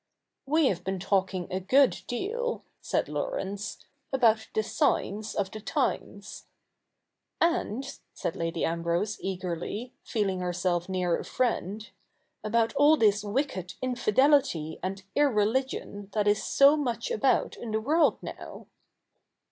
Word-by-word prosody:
' - - -58
We 310 +2 +3
have 180 -8 0
been 190 +1 -2
talking 190 -1 0
a 185 - 0
good 255 +8 +3
deal,' 465 - -2 0.2
said - - 0
Laurence, 205 - -4
' 280 - -47
about 225 -4 +3
the 215 - +2
signs 210 0 0
of 195 -1 -1
the 215 - -7
times.' - - -3 0.5
' - - -56
And,' 275 - 0
said 165 - -4
Lady 165 0 -1
Ambrose 170 +5 -1
eagerly, 190 +5 -4
feeling 195 -4 -1
herself 180 0 -1
near 180 -2 0
a - - -5
friend, 220 -4 -1 0.3
' - - -47
about 225 +1 +1
all 295 +2 +5
this 210 -3 +3
wicked 205 - -2
infidelity 255 - +2
and 195 +1 -4
irrehgion 225 -5 0
that 210 -1 +1
is 205 +1 +3
so 280 +2 +6
much 290 - -2
about 470 - +2
in 235 - -7
the 220 0 0
world 305 +9 +3
now.' - - -8
215 Hz, 140 wpm, -28 LUFS, 190-265 Hz, 0.5 s, so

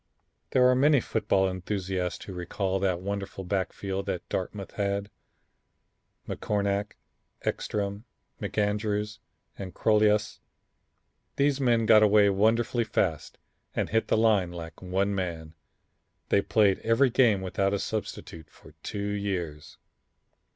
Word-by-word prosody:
There 125 -1 +4
are 125 - +5
many 140 +3 +4
football 105 -4 +1
enthusiasts 95 -1 -3
who 95 - -7
recall 95 +2 -2
that 90 -2 0
wonderful 100 0 -4
backfield 95 +1 -3
that 90 -3 -3
Dartmouth 95 +1 -4
had, 100 0 -2 1.2
McCornack, 100 0 -1 0.5
Eckstrom, 100 +1 -2 0.4
McAndrews 105 0 -1 0.4
and 95 -2 -7
Crolius. 105 -1 +2 1.0
These 140 0 +2
men 120 -3 +3
got 110 -1 +7
away 105 -1 +5
wonderfully 115 +4 +2
fast 85 -8 -1 0.4
and - - -1
hit 110 +1 +1
the - - +2
line 105 -5 +3
like 85 -2 -9
one 95 +2 0
man. 85 -4 -4 0.8
They 100 - +4
played 100 -2 +3
every 120 +3 +3
game 115 -6 +4
without 95 +1 0
a 100 - +1
substitute 85 -7 -5
for - - -17
two 100 +2 -4
years. 90 -7 -4
100 Hz, 120 wpm, -27 LUFS, 95-110 Hz, 1.2 s, got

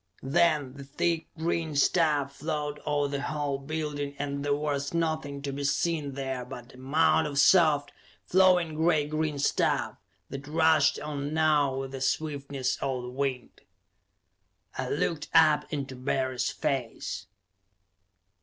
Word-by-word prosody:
Then 150 -2 +2
the 140 0 -9
thick 165 +4 -1
green 160 -1 -1
stuff 145 -2 +2
flowed 150 -1 -3
over 145 -1 +1
the 140 0 -3
whole 145 -2 -2
building 145 -1 -4
and 140 0 -3
there 145 0 +1
was 145 0 -2
nothing 155 -4 -2
to 140 - -3
be 140 +1 -4
seen 145 0 0
there 135 -2 -3
but 125 -1 -10
a - - -14
mound 155 +3 +3
of 145 -1 -5
soft, 150 -2 +5 0.3
flowing, 180 -3 +4
gray 160 -1 +2
green 155 0 -2
stuff 140 - 0 0.3
that 135 +1 -7
rushed 160 -2 +3
on 145 0 -4
now 150 -4 +3
with 135 0 -4
the 135 -1 -6
swiftness 140 -1 -1
of 130 -2 -2
the 125 - -6
wind. 130 -1 -3 1.1
I - - -3
looked 155 -3 -1
up, 155 -2 +5
into 140 -3 -4
Barry's 130 0 -1
face. 125 -5 -3
145 Hz, 140 wpm, -28 LUFS, 140-155 Hz, 1.1 s, soft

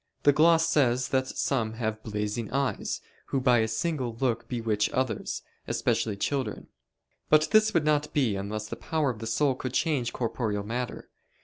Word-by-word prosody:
the 145 - +6
gloss 165 +2 +5
says 130 -5 +2
that 130 -1 +1
"some 115 -6 -1
have 110 -1 -3
blazing 105 +1 -3
eyes, 140 -1 -1 0.3
who 135 - 0
by 125 -2 +4
a 110 - +2
single 125 +1 -2
look 120 -3 0
bewitch 110 -4 0
others, 130 -4 -2 0.2
especially 105 -3 0
children." 135 +5 -2 0.6
But 155 0 +4
this 215 0 +5
would 160 -3 +3
not 150 -1 +2
be 125 -9 +1
unless 105 +2 -4
the - - -5
power 155 -4 0
of 110 - -10
the 115 - -5
soul 135 +5 +2
could 130 0 -5
change 140 -8 +1
corporeal 110 -4 -2
matter. 120 +4 -4
125 Hz, 170 wpm, -28 LUFS, 110-145 Hz, 0.6 s, the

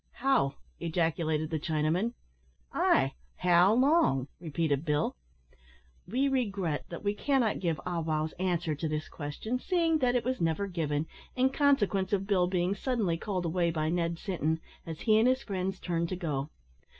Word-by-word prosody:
"How!" 235 - +2 0.2
ejaculated 160 -2 0
the 160 - 0
Chinaman. 160 +9 0 0.6
"Ay, - - +3 0.2
how 180 +2 +5
long?" 255 - +3
repeated 160 -3 -1
Bill. 150 -1 0 0.9
We 255 +8 +1
regret 200 - -1
that 170 - -7
we 205 0 +1
cannot 250 -1 +1
give 165 -4 -1
Ah 175 -2 -1
wow's 155 -1 -1
answer 175 -3 0
to 160 +2 -3
this 150 0 -2
question, 170 +12 -4
seeing 330 -1 +1
that 250 -2 +2
it 240 -2 +1
was 255 -3 -1
never 165 +4 +1
given, 160 -5 -1 0.3
in 260 0 +3
consequence 210 -10 +2
of 195 -1 +1
Bill 190 -3 +2
being 180 +1 +1
suddenly 210 -5 0
called 185 -3 -2
away 170 +1 +1
by 155 -1 -1
Ned 170 0 0
Sinton, 160 -4 -1 0.3
as 160 -1 -6
he 215 -1 +4
and 230 - +4
his 260 +1 +2
friends 190 -2 -3
turned 170 -1 -1
to 185 - -2
go. 150 -5 -3
180 Hz, 160 wpm, -30 LUFS, 160-215 Hz, 0.9 s, how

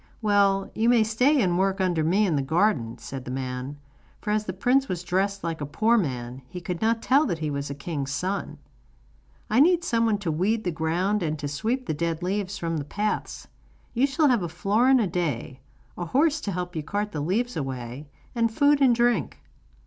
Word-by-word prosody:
'Well, 200 -2 +2
you 225 +2 +2
may 240 -2 +5
stay 250 +7 +2
and 175 -1 +1
work 195 0 +1
under 175 -4 +1
me 190 +7 +3
in 175 -6 +1
the 140 - +1
garden,' 145 - +1
said 135 -2 -7
the 125 - -8
man; 130 +2 -4 0.4
for 210 - -3
as 210 0 0
the 185 - -3
prince 255 +8 +2
was 180 -1 -3
dressed 195 +2 -1
like 165 -2 -3
a - - -1
poor 220 +10 +2
man, 130 - -2
he 180 - -6
could 175 0 -5
not 225 +1 +1
tell 280 +3 +4
that 175 - -1
he 155 -2 -3
was 140 0 -3
a 140 - -5
king's 140 -2 -4
son. 185 +8 -3 0.9
'I 220 - +4
need 345 +4 +5
someone 230 -8 +1
to 195 -5 -2
weed 205 +8 0
the 180 - -1
ground 175 +6 0
and 155 -2 -1
to 145 - -4
sweep 225 - -2
the - - -1
dead 165 +2 -2
leaves 200 +1 -2
from 165 -3 -2
the 145 - -3
paths. 210 +8 -3 0.5
You 250 +3 +3
shall 295 +1 +2
have 240 -5 +3
a 175 - -3
florin 215 +10 +3
a 225 - +2
day, 155 -8 -3 0.4
a 175 - -4
horse 295 - +2
to 200 - -3
help 180 -1 -4
you 160 - -1
to 150 - -15
cart 205 +1 -2
the 150 - -3
leaves 230 +10 -1
away, 130 0 -5 0.3
and 230 -2 +1
food 285 +3 +3
and 255 -3 +5
drink. 240 -6 +1
190 Hz, 215 wpm, -25 LUFS, 155-225 Hz, 0.9 s, may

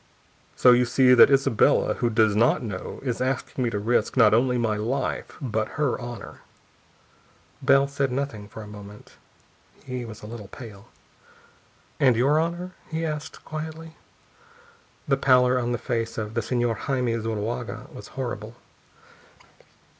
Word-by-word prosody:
So 125 - +6
you 125 0 +5
see 125 +1 +4
that 125 - +8
Isabella, 135 -5 +3
who 120 - 0
does 110 -2 +3
not 115 +3 +3
know, 110 -3 -6
is 125 -3 -2
asking 130 0 -2
me 120 - +1
to 110 - -3
risk, 115 +5 0
not 110 -4 +6
only 125 +2 +3
my 115 -3 0
life, 120 +6 -3
but 110 -5 -3
her 145 -4 0
honor." 120 -1 -8 1.2
Bell 140 0 +4
said 140 -1 -1
nothing 125 -6 -3
for 110 +1 -9
a - - -11
moment. 105 0 -12 0.7
He 125 -1 -5
was 110 -3 -10
a - - -7
little 110 -2 -8
pale. 105 -2 -11 1.1
"And 130 -4 +5
your 140 +6 +3
honor?" 175 +3 -2 0.2
he 160 +1 -2
asked 150 -1 -6
quietly. 160 +1 -7 1.1
The 135 -1 +2
pallor 130 -1 +4
on 120 0 -1
the 120 - 0
face 115 -1 -3
of 110 -1 -4
the 115 - 0
Señor 120 -2 0
Jaime 125 -4 -1
Zuloaga 115 +2 -4
was - - -10
horrible. - - -5
120 Hz, 150 wpm, -25 LUFS, 110-135 Hz, 1.2 s, that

